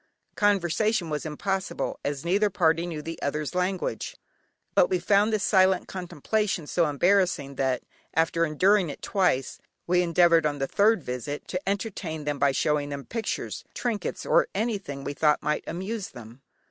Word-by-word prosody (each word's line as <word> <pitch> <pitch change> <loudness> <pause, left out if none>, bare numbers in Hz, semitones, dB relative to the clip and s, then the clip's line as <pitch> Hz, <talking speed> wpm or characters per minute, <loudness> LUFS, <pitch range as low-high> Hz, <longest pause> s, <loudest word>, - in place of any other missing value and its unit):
Conversation 200 -2 +1
was 150 +1 -2
impossible, 195 +5 -3
as 145 +2 -3
neither 200 +4 +2
party 170 -3 +2
knew 155 -3 -5
the 165 +1 -6
other's 150 +2 -2
language, 180 +1 -2 0.6
but - - +4
we 370 - +2
found 205 - +3
this 215 -2 0
silent 190 -2 +3
contemplation 180 +1 -2
so 170 +2 +1
embarrassing, 175 -2 +2
that, 130 -2 0 0.3
after 165 +1 +2
enduring 180 +4 +3
it 140 - -8
twice, 180 - 0 0.3
we 180 +1 +3
endeavoured 170 -2 +4
on 145 -1 -2
the 135 - -1
third 205 +2 +3
visit 125 +4 -5
to 180 +1 -3
entertain 190 -6 -3
them 145 -1 -2
by 140 0 +4
showing 145 +1 0
them 140 -1 -6
pictures, 230 -1 -4
trinkets, 230 -4 -3
or - - +4
anything 195 -10 -2
we 145 - -3
thought 150 +1 +2
might 150 - 0
amuse 190 +5 -4
them. 120 +2 -12
170 Hz, 160 wpm, -26 LUFS, 150-200 Hz, 0.6 s, but